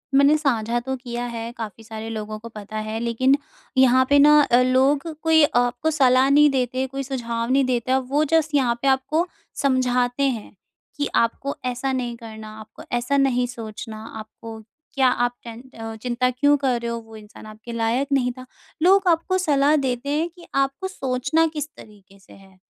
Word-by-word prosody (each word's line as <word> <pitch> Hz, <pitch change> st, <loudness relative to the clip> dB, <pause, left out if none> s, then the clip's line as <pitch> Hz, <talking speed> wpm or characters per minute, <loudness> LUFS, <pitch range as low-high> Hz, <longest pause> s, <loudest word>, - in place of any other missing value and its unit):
मैंने 280 Hz, +2 st, +6 dB
साझा 240 Hz, -6 st, 0 dB
तो 265 Hz, +2 st, -4 dB
किया 245 Hz, -1 st, -5 dB
है, 230 Hz, -1 st, -5 dB
काफ़ी 225 Hz, 0 st, -7 dB
सारे 220 Hz, 0 st, -7 dB
लोगों 215 Hz, -1 st, -5 dB
को 230 Hz, +2 st, -10 dB
पता 215 Hz, -1 st, -8 dB
है। 220 Hz, +1 st, -3 dB
लेकिन 235 Hz, +3 st, +2 dB, 0.4 s
यहाँ 260 Hz, 0 st, +5 dB
पे 285 Hz, 0 st, +5 dB
न 285 Hz, -, +7 dB, 0.2 s
अ, 245 Hz, +1 st, +6 dB
लोग 265 Hz, +4 st, +2 dB, 0.2 s
कोई 320 Hz, -1 st, +5 dB
आपको 245 Hz, +5 st, +1 dB
सलाह 265 Hz, -3 st, +4 dB
नहीं 295 Hz, +1 st, +6 dB
देते 255 Hz, -1 st, -1 dB
कोई 270 Hz, +1 st, -5 dB
सुझाव 235 Hz, -3 st, -3 dB
नहीं 270 Hz, +1 st, +4 dB
देता, 255 Hz, +1 st, +1 dB
वो 270 Hz, +3 st, 0 dB
जस्ट 315 Hz, -2 st, +2 dB
यहाँ 250 Hz, -4 st, +2 dB
पे 275 Hz, -, 0 dB
आपको 270 Hz, +6 st, +1 dB, 0.4 s
समझाते 250 Hz, -1 st, +1 dB
हैं, 240 Hz, -7 st, -2 dB, 0.4 s
कि 290 Hz, -1 st, 0 dB
आपको 235 Hz, +4 st, 0 dB
ऐसा 250 Hz, +2 st, -2 dB
नहीं 245 Hz, -2 st, -2 dB
करना, 220 Hz, -2 st, -10 dB
आपको 215 Hz, -, -12 dB
ऐसा 245 Hz, +4 st, 0 dB
नहीं 260 Hz, -3 st, +2 dB
सोचना, 220 Hz, -2 st, -8 dB, 0.2 s
आपको 220 Hz, +1 st, -10 dB, 0.3 s
क्या 270 Hz, -2 st, +3 dB, 0.2 s
आप 245 Hz, -, -2 dB
टेन 230 Hz, 0 st, -9 dB, 0.2 s
अ, 225 Hz, 0 st, -6 dB
चिंता 245 Hz, +2 st, -1 dB
क्यों 285 Hz, +4 st, +3 dB
कर 260 Hz, -4 st, 0 dB
रहे 235 Hz, 0 st, -3 dB
हो, 235 Hz, -, -3 dB
वो 225 Hz, -1 st, -14 dB
इंसान 215 Hz, 0 st, -13 dB
आपके 215 Hz, +2 st, -10 dB
लायक 230 Hz, +4 st, 0 dB
नहीं 250 Hz, -2 st, +2 dB
था। 255 Hz, -, -9 dB, 0.4 s
लोग 385 Hz, +2 st, +5 dB
आपको 345 Hz, +2 st, +2 dB
सलाह 295 Hz, -4 st, +3 dB
देते 250 Hz, +2 st, -2 dB
हैं, 305 Hz, +3 st, 0 dB
कि 345 Hz, 0 st, -16 dB
आपको 275 Hz, +7 st, 0 dB
सोचना 270 Hz, -1 st, 0 dB
किस 300 Hz, -1 st, -3 dB
तरीके 200 Hz, -2 st, -16 dB
से 195 Hz, -, -18 dB
है। 190 Hz, -1 st, -18 dB
250 Hz, 185 wpm, -22 LUFS, 230-275 Hz, 0.4 s, न